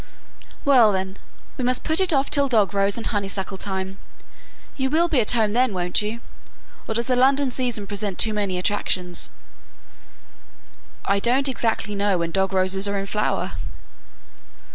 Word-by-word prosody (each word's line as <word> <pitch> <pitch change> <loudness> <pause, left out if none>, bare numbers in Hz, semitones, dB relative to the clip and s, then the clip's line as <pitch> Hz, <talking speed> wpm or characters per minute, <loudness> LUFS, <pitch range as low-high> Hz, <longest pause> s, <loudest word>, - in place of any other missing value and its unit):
"Well, 250 -6 +6
then, 190 0 -3 0.4
we 260 - -3
must 250 0 +2
put 315 +3 +2
it 380 -2 +3
off 275 -2 +1
till 285 -1 +3
dog 215 -6 +2
rose 200 +1 +1
and 230 - -5
honey 205 -3 -1
suckle 195 0 -3
time. 190 -1 -4 0.8
You 265 -1 -1
will 325 +4 +2
be 300 -6 +2
at 215 - +1
home 220 -3 +2
then, 245 0 +2
won't 180 +1 0
you? 215 +3 -4 0.7
or 220 - -3
does 235 +1 0
the 255 - +1
London 270 +1 +3
season 245 -5 0
present 200 -1 -3
too 220 - +2
many 200 -3 -1
attractions?" 180 -2 -1 1.8
"I 200 0 +2
don't 255 +6 +2
exactly 225 -4 -1
know 200 -1 +1
when 170 -1 -2
dog 190 +1 0
roses 190 +1 +1
are 200 0 -1
in 195 - -3
flower!" 210 +2 -1
210 Hz, 165 wpm, -23 LUFS, 195-255 Hz, 1.8 s, Well